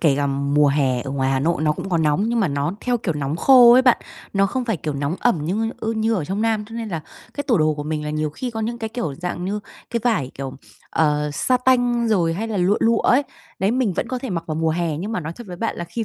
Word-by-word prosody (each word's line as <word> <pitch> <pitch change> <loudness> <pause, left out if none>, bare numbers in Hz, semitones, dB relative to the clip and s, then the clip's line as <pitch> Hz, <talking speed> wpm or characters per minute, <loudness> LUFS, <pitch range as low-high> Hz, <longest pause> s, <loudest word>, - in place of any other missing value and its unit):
kể 145 -5 +3
cả 145 - +1
mùa 140 +1 +2
hè 135 -3 +1
ở 135 - -6
ngoài 135 -1 0
Hà 135 -1 +1
Nội 160 +1 0
nó 150 -1 +3
cũng 175 - -6
có 170 -3 +1
nóng 155 +6 +2
nhưng 235 -1 +1
mà 190 - +2
nó 145 +4 -1
theo, 245 -1 0
kiểu, 170 -7 -2
nóng 145 +1 -2
khô 245 +1 +7
ấy 255 +1 +6
bạn, 250 -2 +5 0.4
nó 195 0 +3
không 255 +5 -2
phải, 225 -5 -1
kiểu, 150 -2 -4
nóng 145 +5 -2
ẩm 165 -11 +1
như, 220 +6 -1
ơ, 225 +1 -1
như 220 +1 +1
ở 180 -8 -1
trong 195 +6 -2
Nam, 220 -2 +1
cho 225 - -10
nên 230 -1 -4
là 165 -5 -3 0.3
cái 285 - -2
tủ 230 - +3
đồ 155 0 +2
của 145 - -5
mình 150 0 -3
là 150 - -3
nhiều 155 0 -1
khi 245 - -5
có 225 -1 -4
những 235 +2 -3
cái, 225 - -3
kiểu, 220 - -3
dạng 175 +2 -4
như 205 +2 -2 0.3
cái 235 - -1
vải, 145 - +1
kiểu, 135 -1 -5 0.4
ờ, 150 -1 +1
sa 255 - +1
tanh 245 -2 +2
rồi 175 -6 +2
hay 225 +4 -3
là 215 - -2
lụa, 185 +3 +3
lụa 230 0 +3
ấy. 270 +4 +4 0.4
Đấy 195 +3 +1
mình 245 -5 +1
vẫn 235 - -3
có 255 -1 -2
thể 255 -4 -6
mặc 170 -2 -3
vào 155 - -3
mùa 160 0 +1
hè 165 -2 -1
nhưng 205 +7 -4
mà 180 - -1
nói 160 +1 -5
thật 240 - -9
với 180 -1 -7
bạn 225 - -2
là 175 - -4
khi 220 +7 -4
180 Hz, 295 wpm, -21 LUFS, 150-230 Hz, 0.4 s, khô